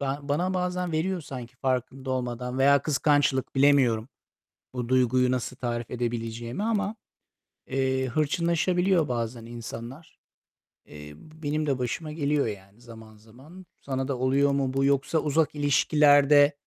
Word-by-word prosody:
Ba 140 0 -2
bana 170 +7 -1
bazen 180 -1 -2
veriyor 175 +3 -1
sanki 125 -4 -9
farkında 130 +1 -2
olmadan. 125 0 -3
Veya 140 +1 +5
kıskançlık. 145 -3 +1
Bilemiyorum, 135 -4 +3 0.7
bu 120 -1 -4
duyguyu 125 0 +3
nasıl 130 0 -2
tarif 120 -2 -4
edebileceğimi 120 - -4
ama, 215 -1 -1 0.7
eee, 130 -1 0
hırçınlaşabiliyor 170 +4 +1
bazen 115 -1 -3
insanlar. 120 +5 -9 0.7
Eee, 75 0 -11
benim 155 - -4
de 135 -3 0
başıma 125 +6 -3
geliyor, 150 -2 0
yani, 100 +1 -9
zaman 110 -2 -13
zaman. 135 - -15 0.2
Sana 135 -1 -3
da 135 -3 -2
oluyor 135 +2 +2
mu 135 -1 0
bu? 135 0 +1
Yoksa 140 +3 +1
uzak 155 +1 0
ilişkilerde, 145 0 +4
135 Hz, 130 wpm, -26 LUFS, 120-150 Hz, 0.7 s, Veya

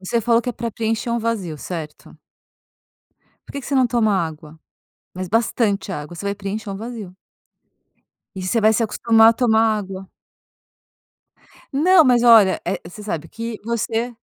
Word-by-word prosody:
Você 230 +5 -1
falou 230 +1 +2
que - - -5
é - - -1
para 235 0 -4
preencher 225 +2 -2
um 235 - 0
vazio, 215 -9 -3
certo? 155 -3 -8 1.3
Por - - -12
que 280 - -5
que - - -11
você 280 - -2
não 260 -1 +4
toma 225 -4 +1
água? 160 -2 -4 0.6
Mas 185 -1 -5
bastante 220 -2 0
água. 150 +1 -7
Você 200 - -8
vai 200 - -1
preencher 205 +1 -5
um 195 - -5
vazio. 215 -4 -8 1.2
E 190 - -6
você 220 +5 0
vai 215 +1 +4
se 225 - +1
acostumar 225 +1 +4
a - - +1
tomar 225 -2 +2 0.2
água. 190 -1 -8 1.6
Não, 330 +4 +5
mas 245 -3 +4
olha, 220 -5 +6
eh, - - -2
você 175 +5 -11
sabe 165 -6 -5
que 230 0 -6
você 235 +1 -2
220 Hz, 170 wpm, -20 LUFS, 190-235 Hz, 1.6 s, olha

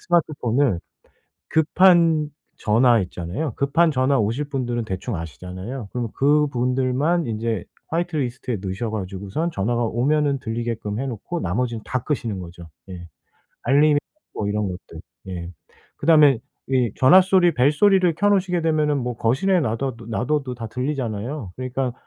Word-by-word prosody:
스마트폰을 140 - +1 0.7
급한 165 -1 +4 0.3
전화 115 +2 +4
있잖아요. 90 - -4
급한 160 +4 +2
전화 135 0 +2
오실 115 +8 -1
분들은 120 -4 -2
대충 95 -2 -4
아시잖아요. 95 - -7
그러면 120 -3 -3
그분들만 140 +2 +1
인제 110 -3 -2 0.2
화이트리스트에 145 -8 -2
넣으셔 100 +4 -3
가지고선 100 - -3
전화가 120 +1 -1
오면은 140 +5 +1
들리게끔 115 -2 -3
해 135 - -2
놓고 130 - -5
나머지는 115 +5 -2
다 130 -2 -2
끄시는 115 -9 -2
거죠 85 -1 -10 0.2
예 90 -2 -8 0.6
알림 145 +3 +4 0.4
뭐 105 - -2
이런 105 -1 -1
것들. 90 0 -8 0.3
예. 85 -1 -6 0.5
그 - - -7
다음에 150 -6 +6 0.3
이 125 -5 +2
전화 180 +9 +7
소리 185 -2 +3
벨 130 +4 +3
소리를 185 +1 +4
켜 205 - +1
놓으시게 185 -3 +1
되면은 155 -2 +1
뭐 125 -2 -3
거실에 175 +12 +2
놔돠도 115 -2 -3
놔둬도 130 +3 -1
다 115 -2 -6
들리잖아요. 125 -2 -3
그러니까 130 0 -3
125 Hz, 340 characters per minute, -22 LUFS, 110-150 Hz, 0.7 s, 전화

